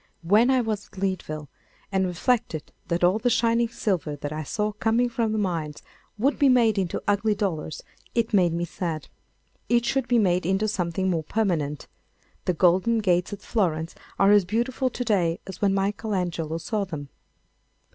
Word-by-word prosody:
When 210 +8 +4
I 260 -1 +4
was 215 -3 -3
at - - -20
Leadville 165 -6 -3 0.4
and 190 -1 +1
reflected 180 -3 -1 0.2
that 170 0 -1
all 185 +5 +4
the 245 - +1
shining 230 0 +2
silver 190 -10 -1
that 145 +1 -5
I 155 - -3
saw 210 +8 -2
coming 225 +3 +1
from 230 -2 -1
the 220 - -1
mines 165 -7 -2 0.3
would 270 +7 +1
be 280 - +5
made 230 -5 +4
into 180 -3 -2
ugly 205 +1 +2
dollars, 175 -7 -3 0.3
it 230 -1 0
made 180 -4 +4
me 170 +1 -1
sad. 165 -3 -4 0.6
It 240 0 +3
should 265 0 0
be 245 - +3
made 180 -4 +2
into 190 +5 +1
something 190 -2 -1
more 170 -4 0
permanent. 160 -10 -1 0.6
The 180 - +1
golden 185 +7 +3
gates 180 -4 +1
at 205 -1 -7
Florence 165 -7 -1 0.2
are 195 +1 +5
as 205 -1 +6
beautiful 240 +7 0
to 245 - -4
day 175 -7 +1
as 190 -1 -9
when 200 -2 +3
Michael 200 +2 -1
Angelo 165 -3 -2
saw 205 +5 -2
them. 155 -7 -6
195 Hz, 175 wpm, -25 LUFS, 170-225 Hz, 0.6 s, as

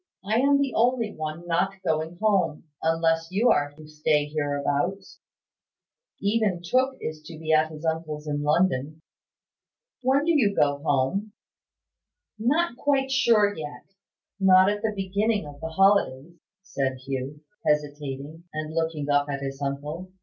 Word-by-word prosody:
"I 220 +3 +2
am 280 +2 +4
the 280 -1 0
only 235 -2 +1
one 155 +2 -5
not 175 +3 0
going 160 +2 -1
home, 195 -6 +1 0.2
unless 165 0 +1
you 215 +6 +3
are 145 0 +1
to 155 +1 -13
stay 150 -1 +1
hereabouts. 145 +5 -2 1.0
Even 200 -4 0
Tooke 260 +8 +1
is 155 0 -5
to 155 +1 -10
be 160 0 -1
at 155 0 +4
his 155 +1 -9
uncle's 160 -2 -2
in 145 -1 -2
London. 155 -1 +1 1.0
When 270 +3 +2
do 335 - +3
you 225 -11 +3
go 145 -1 +2
home?" 145 +9 0 1.1
"Not 270 +4 +1
quite 270 -1 +1
yet; 205 -7 +1 0.5
not 190 0 +6
at 205 0 -3
the 220 -1 -1
beginning 200 +1 0
of 145 -1 -11
the 160 - -4
holidays," 175 -5 +2 0.3
said 135 -9 -2
Hugh, 135 +2 -4 0.2
hesitating, 150 +1 -2
and 155 0 -5
looking 160 -3 -1
up 145 0 +2
at 140 -1 -3
his 135 0 -5
uncle. 150 +6 -4
160 Hz, 140 wpm, -26 LUFS, 150-205 Hz, 1.1 s, not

